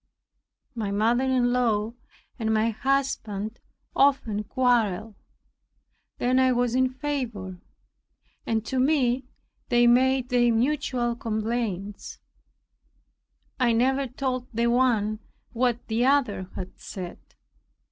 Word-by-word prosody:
My 220 -4 -3
mother 225 +6 +2
in 250 -2 +2
law 225 -3 +1 0.5
and 220 -1 0
my 220 +1 +2
husband 225 -4 -2 0.4
often 235 -7 +2
quarrelled. 225 -4 +1 1.0
Then 255 +1 +2
I 260 -1 +4
was 245 -1 +1
in 260 0 +3
favor, 250 -10 -4 0.8
and 225 -1 -1
to 260 - -1
me 260 -2 +2 0.4
they 240 -1 +4
made 255 +1 +3
their 240 -1 +3
mutual 245 -1 0
complaints. 215 -3 -3 1.4
I 245 -2 +3
never 265 +4 +2
told 255 -1 -3
the 235 0 0
one 225 -4 +2 0.3
what 245 0 0
the 225 +2 0
other 245 -10 +1
had 185 0 -7
said. 180 -3 -7
240 Hz, 105 wpm, -26 LUFS, 220-260 Hz, 1.4 s, I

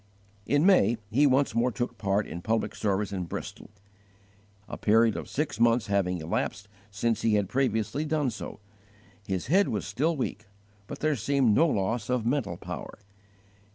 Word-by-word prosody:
In 145 +3 +3
May 180 - +5
he 140 +6 +4
once 135 -2 +2
more 120 +2 +2
took 120 -1 -4
part 100 +1 +1
in 85 - -7
public 110 +4 -1
services 100 0 -1
in 90 -2 -3
Bristol, 85 - -7 1.0
a - - -6
period 110 +1 +3
of - - -6
six 150 -4 -2
months 115 0 +3
having 95 -3 0
elapsed 100 +5 -3 0.2
since 110 +2 -1
he 110 -2 +2
had 100 -2 +1
previously 130 +3 0
done 150 -4 0
so. 110 - -8 0.7
His 95 -3 -2
head 190 - +3
was 105 -3 -2
still 160 +4 0
weak, 130 - -4 0.4
but - - -8
there 155 -1 +2
seemed 130 -1 +2
no 160 +10 +4
loss 110 -2 -1
of 125 -3 0
mental 125 -3 -1
power. - - -7
115 Hz, 165 wpm, -27 LUFS, 105-140 Hz, 1.0 s, May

